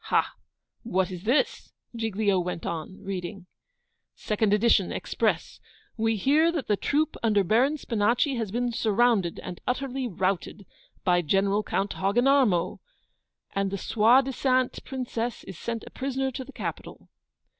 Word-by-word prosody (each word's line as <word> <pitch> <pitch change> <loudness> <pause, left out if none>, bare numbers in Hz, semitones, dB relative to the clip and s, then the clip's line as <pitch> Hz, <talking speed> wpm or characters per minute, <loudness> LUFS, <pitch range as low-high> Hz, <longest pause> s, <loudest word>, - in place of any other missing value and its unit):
'Ha! - - +1 0.5
what 190 -5 0
is 180 +1 -7
this?' 250 +7 +1 0.2
Giglio 215 -3 +1
went 180 -2 -4
on, 170 +3 -5
reading 190 0 -5 0.7
'SECOND 210 -1 0
EDITION, 210 -3 +3
EXPRESS. - - -1 0.4
We 225 0 +1
hear 295 - +3
that 315 -6 -3
the 210 - +3
troop 295 +8 0
under 210 -3 +3
Baron 250 - +2
Spinachi 235 +3 +1
has 225 -4 -2
been 240 +4 -1
surrounded, 225 -5 +2
and 180 - -7
utterly 260 0 -1
routed, 190 0 -2 0.4
by 175 -1 +3
General 195 +5 +2
Count 200 -1 -2
Hogginarmo, 230 -2 +2 0.7
and 195 0 0
the 200 - -3
soidisant 255 +4 +2
Princess 245 -3 -4
is 190 -3 -10
sent 230 -1 -4
a - - -11
prisoner 265 0 -2
to 260 +1 -5
the 265 - -12
capital. - - -6
220 Hz, 135 wpm, -27 LUFS, 195-255 Hz, 0.7 s, EDITION